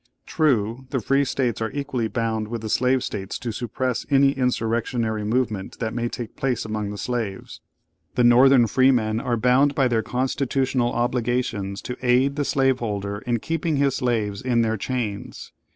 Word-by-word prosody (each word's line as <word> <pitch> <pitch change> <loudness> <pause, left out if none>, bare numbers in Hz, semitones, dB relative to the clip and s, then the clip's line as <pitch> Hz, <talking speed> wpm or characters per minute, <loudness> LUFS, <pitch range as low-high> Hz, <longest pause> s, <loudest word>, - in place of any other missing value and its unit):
True, 130 -4 0
the 130 - -1
Free 135 +5 +2
States 125 -4 -1
are 110 - -1
equally 140 -5 -2
bound 110 -1 -2
with 115 0 -5
the 110 - -4
Slave 125 +3 +2
States 95 -2 -4
to 120 - -4
suppress 125 +1 -2
any 140 -1 +5
insurrectionary 115 -3 -1
movement 110 -3 -1
that 110 -2 -3
may 120 0 -1
take 120 -2 -7
place 130 -5 -1
among 105 -1 -3
the 105 - -6
slaves. 110 -3 -4 0.5
The 125 - +3
Northern 125 +1 +6
freemen 115 -3 +2
are 120 0 -1
bound 130 +5 +3
by 135 -2 +3
their 115 -2 +1
constitutional 130 0 0
obligations 120 -4 -1
to 125 - -5
aid 130 +2 +3
the 145 -1 -1
slaveholder 110 -8 0
in 120 -2 0
keeping 165 -1 -1
his 140 -1 +1
slaves 110 -6 -1
in 120 -2 +2
their 110 0 0
chains. 110 -2 -4
120 Hz, 165 wpm, -23 LUFS, 110-130 Hz, 0.5 s, Northern